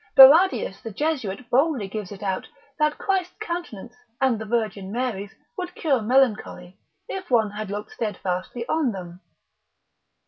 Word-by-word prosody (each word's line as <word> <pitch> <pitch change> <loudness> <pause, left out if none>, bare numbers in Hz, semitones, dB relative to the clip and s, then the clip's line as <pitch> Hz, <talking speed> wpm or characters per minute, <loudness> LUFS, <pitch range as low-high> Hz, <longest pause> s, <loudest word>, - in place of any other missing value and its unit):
Barradius 275 - +7
the 225 - -6
Jesuit 250 -3 -2
boldly 270 -5 +2
gives 205 -1 -6
it 200 0 -9
out, 190 -2 -2 0.3
that 300 0 +2
Christ's 370 -2 -1
countenance, 340 - -5 0.3
and 260 -5 +2
the 220 - -5
Virgin 215 -4 -2
Mary's, 215 -4 -3 0.2
would 360 0 -5
cure 275 -7 +1
melancholy, 215 -7 +1 0.3
if 375 -1 -6
one 225 -4 +3
had 210 -1 -5
looked 205 +2 -5
steadfastly 205 +2 -3
on 300 -8 +1
them. 180 -1 -8
230 Hz, 140 wpm, -24 LUFS, 200-295 Hz, 0.3 s, Barradius